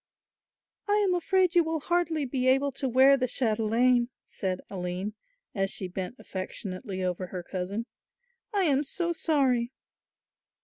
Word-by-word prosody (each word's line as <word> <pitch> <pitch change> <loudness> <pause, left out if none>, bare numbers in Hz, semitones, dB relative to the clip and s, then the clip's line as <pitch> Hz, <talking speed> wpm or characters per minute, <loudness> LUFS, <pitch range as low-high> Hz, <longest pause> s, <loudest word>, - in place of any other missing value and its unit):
"I 410 - +3
am 405 -3 +3
afraid 365 0 +2
you 345 - +5
will 320 0 -1
hardly 335 -3 0
be 255 0 -1
able 270 +2 +3
to 265 0 -2
wear 265 +3 +6
the 255 -1 0
chatelaine," 240 +1 +2 0.2
said 185 -1 -3
Aline, 185 +2 -4 0.4
as 195 -1 0
she 190 - -2
bent 185 +5 -5
affectionately 190 0 -5
over 180 0 -2
her 180 -1 -6
cousin. 190 +5 -4 0.7
"I 405 -3 +2
am 285 -4 +3
so 345 +4 0
sorry." 265 -7 +2
250 Hz, 140 wpm, -28 LUFS, 195-310 Hz, 0.7 s, wear